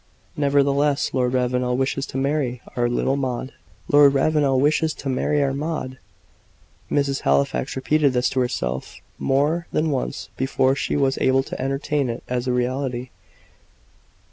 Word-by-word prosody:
"Nevertheless, 140 0 +2
Lord 125 -1 +1
Ravenel 125 0 0
wishes 135 +1 -1
to - - -6
marry 135 -3 -1 0.2
our 120 -1 +1
little 130 +2 0
Maud!" 130 -1 -3 0.3
"Lord 145 -1 +6
Ravenel 140 -2 +2
wishes 155 +3 +2
to 135 - -5
marry 145 +3 +1
our 135 -1 0
Maud!" 140 -3 -4 0.9
Mrs. 140 -1 0
Halifax 70 -2 +1
repeated 140 +1 +2
this 125 0 +2
to 130 - 0
herself 65 - -2 0.2
more 150 +6 +1
than 155 0 0
once 130 -3 -3
before 130 0 +1
she 135 - -2
was 135 -2 +1
able 135 0 +3
to - - -6
entertain 135 0 -1
it 115 - -5
as 125 0 -2
a - - +2
reality. 125 0 -2
135 Hz, 145 wpm, -22 LUFS, 125-145 Hz, 0.9 s, Lord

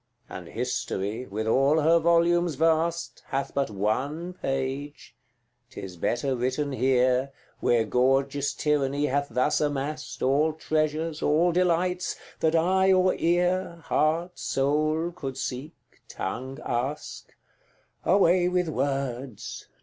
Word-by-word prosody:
And 90 -2 -8
History, 120 -2 -3
with 110 +2 -3
all 135 +7 +3
her 165 +3 +5
volumes 170 0 +3
vast, 165 +2 0
Hath 135 +1 -2
but 140 -3 0
ONE 135 - -2
page, 135 -1 -4 0.5
'tis 95 -8 -8
better 120 +9 -1
written 130 +4 -1
here, 130 0 +2 0.3
Where 115 -2 +2
gorgeous 135 +4 +1
Tyranny 145 -1 +1
hath 140 +1 0
thus 140 +5 +1
amassed 145 0 -3
All 145 +4 +3
treasures, 155 0 -1
all 165 +4 +3
delights, 180 +1 +1 0.2
that 160 0 +2
eye 190 +3 +3
or 185 0 +4
ear, 175 0 0
Heart, 165 +3 0
soul 155 +4 0
could 135 -6 -6
seek, 135 +5 -5 0.3
tongue 130 +7 -5
ask 130 +5 -4 0.7
Away 180 -1 +4
with 180 -2 0
words! 135 -4 -3
145 Hz, 115 wpm, -26 LUFS, 130-165 Hz, 0.7 s, her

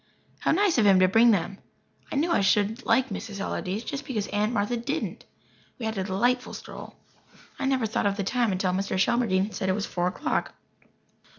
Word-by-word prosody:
How - - -1
nice 370 -4 +3
of 215 - +4
him 190 -2 +6
to 185 - +6
bring 225 +5 +5
them! 195 -2 0 0.5
I - - -3
knew 320 +5 +1
I 335 - +3
should 205 +3 +1
like 260 0 +3
Mrs. 200 0 -6
Allardyce, 195 +2 -3
just 280 +4 -5
because 225 -7 -3
Aunt 210 +2 0
Martha 215 +1 0
didn't. 275 +7 -4 0.5
We 235 - -5
had 220 0 -2
a - - 0
delightful 240 +7 0
stroll. - - -10 0.6
I - - -1
never 265 -3 +1
thought 215 -1 0
of 200 0 -1
the 200 - -1
time 235 +1 +1
until 185 0 0
Mr. 190 +1 -1
Shelmardine 200 -1 +2
said 190 -3 -2
it - - +3
was 210 0 -2
four 175 0 -1
o'clock. 305 +12 -2
215 Hz, 200 wpm, -26 LUFS, 195-245 Hz, 0.6 s, him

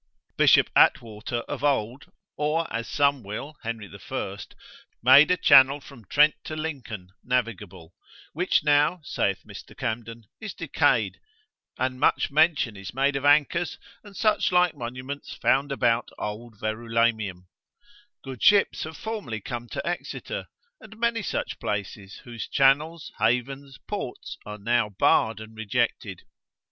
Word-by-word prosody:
B. - - +3 0.3
Atwater 115 +2 +2
of 130 - -7
old, 130 -2 -1 0.2
or 150 +3 0
as 115 0 -3
some 140 -2 +2
will 115 +9 -7
Henry 115 -3 -5 0.2
I. - - -4 0.7
made 135 +4 +8
a 180 - +3
channel 135 -1 +6
from 135 -6 -15
Trent 150 +6 +4
to 155 - -5
Lincoln, 130 - -6
navigable; 105 -9 -3 0.4
which 180 +1 +1
now, 150 +4 +3
saith 100 -9 -1
Mr. - - -12
Camden, 115 0 -4 0.2
is 215 -2 -7
decayed, - - +1 0.6
and 130 0 -2
much 140 - +2
mention 150 -7 +2
is 100 +2 -9
made 135 +1 +1
of 135 +1 -2
anchors, 155 +4 +3 0.3
and 205 -2 -13
such 215 -2 +2
like 180 -1 +3
monuments 130 +2 -7
found 140 +1 +1
about 120 -3 +1
old 110 +1 -6
Verulamium, 110 -4 -1 0.8
good 130 -4 -8
ships 200 -5 +4
have 160 0 -9
formerly 205 - -5
come 120 +2 -6
to - - -5
Exeter, 175 - -4 0.3
and 220 +1 -14
many 235 -1 0
such - - -3
places, 100 -1 -5
whose 120 -3 -7
channels, 150 +4 +2
havens, 135 +5 -1
ports 125 - -6
are 105 0 -6
now 115 +1 +1
barred 110 +2 +2
and 110 0 -11
rejected. 110 -3 -2
125 Hz, 135 wpm, -25 LUFS, 110-150 Hz, 0.8 s, made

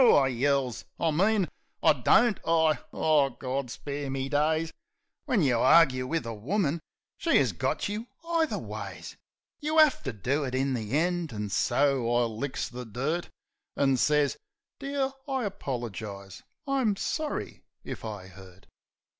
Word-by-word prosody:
I 145 - +6
yells. 130 -1 0 0.2
"I 165 - +2
mean 195 +4 +2 0.4
I 160 - +7
don't 210 - +4
I.. 160 -2 +3
." - - -39
Oh, 150 -3 +3
Gaw 130 0 -2
spare 140 +3 -5
me 135 0 -2
days! 155 +2 +1 0.5
When 245 - +2
you 125 -5 +3
argue 130 -2 +5
wiv 160 -3 -1
a 115 - -4
woman 160 - -1 0.4
she - - +3
'as - - +3
got - - -1
you 210 +3 -4 0.2
either 330 -2 +1
ways! - - -7 0.4
You 310 +1 -1
'a<ue 310 -3 +6
to 135 - -1
do 130 +8 -1
it 130 -2 -3
in 135 +1 +1
the 115 +2 -1
end; 175 -1 0
an' 105 -2 -4
so 130 +2 +2
I 120 0 +3
licks 120 +4 -3
the 125 0 -7
dirt, 135 +10 -2 0.5
An' 135 -1 +3
sez, 150 +2 +2 0.4
"Dear, 275 -1 -1 0.2
I 265 -4 -1
apolergise. 110 - -5 0.2
I'm 265 -7 +1
sorry 305 +9 -3 0.2
if - - -7
I 105 -4 -6
'urt." 95 0 -14
140 Hz, 155 wpm, -28 LUFS, 125-175 Hz, 0.5 s, I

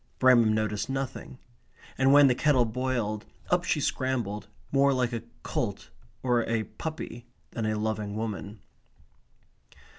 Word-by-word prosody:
Bramham 120 -4 +6
noticed 110 +1 -1
nothing. 135 -1 -4 0.6
And 135 +1 +4
when 145 0 +8
the 130 - +5
kettle 130 -2 +3
boiled, 115 -3 -2 0.2
up - - +3
she - - +1
scrambled, 110 -6 -1 0.2
more 140 0 +4
like 125 -2 0
a 115 - -2 0.2
colt 100 -7 -3 0.3
or 125 -2 +3
a 115 -1 +1
puppy 120 -4 -7 0.2
than 110 -2 -2
a 110 0 0
loving 105 -1 -2
woman. 105 -1 -5
120 Hz, 130 wpm, -28 LUFS, 110-130 Hz, 0.6 s, when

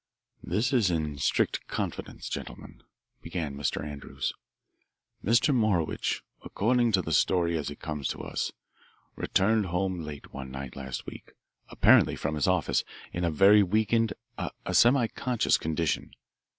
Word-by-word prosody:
"This 120 +6 0
is 115 -7 +4
in 75 -4 -2
strict - - 0
confidence, - - -4
gentlemen," - - -7 0.4
began 80 -6 -4
Mr. 70 0 -2
Andrews. 70 -2 -4 0.9
"Mr. 120 +7 +3
Morowitch, 105 -10 0 0.2
according 120 +3 +1
to 95 -2 +3
the 80 - -4
story 85 +2 +2
as 75 -3 -2
it 75 - -9
comes 75 -3 -3
to - - -4
us, - - -2 0.6
returned 105 +1 +2
home 90 +1 -1
late 75 -3 -8
one 65 -1 -6
night 65 -1 -7
last 65 -1 -6
week, - - -10 0.4
apparently - - +5
from 75 - -3
his 75 -3 0
office, - - +2 0.3
in 90 - -2
a 85 - +2
very 100 +6 +6
weakened, 110 +3 +2 0.3
a - - -3 0.2
semiconscious, 120 -1 +3
condition. 80 +1 -1
90 Hz, 135 wpm, -28 LUFS, 75-110 Hz, 0.9 s, very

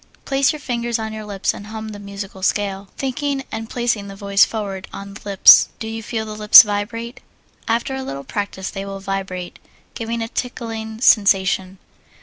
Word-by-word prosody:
Place 275 0 +2
your 305 - -7
finger 240 -4 -3
on 220 0 -4
your 215 -1 -7
lip 200 -2 -8
and 205 - -10
hum 220 0 -6
the 205 -1 -8
musical 200 -1 -8
scale, 195 0 -1
thinking 275 +1 -2
and 225 0 -5
placing 235 -4 -1
the 195 - -9
voice 200 0 +3
forward 200 -4 -3
on 200 0 -8
the 195 - -11
lips. 200 -2 +7
Do 220 - -6
you 225 0 -5
feel 220 0 -4
the 215 - -7
lips 210 0 +9
vibrate? 230 +4 -4 0.5
After 235 +4 0
a 265 - -3
little 140 - -6
practise 200 0 -4
they 195 - -5
will 195 0 -6
vibrate, 195 -2 -5 0.3
giving 230 0 -3
a - - -4
tickling 225 -2 -5
sensation. 195 -4 +3
210 Hz, 180 wpm, -20 LUFS, 195-230 Hz, 0.5 s, lips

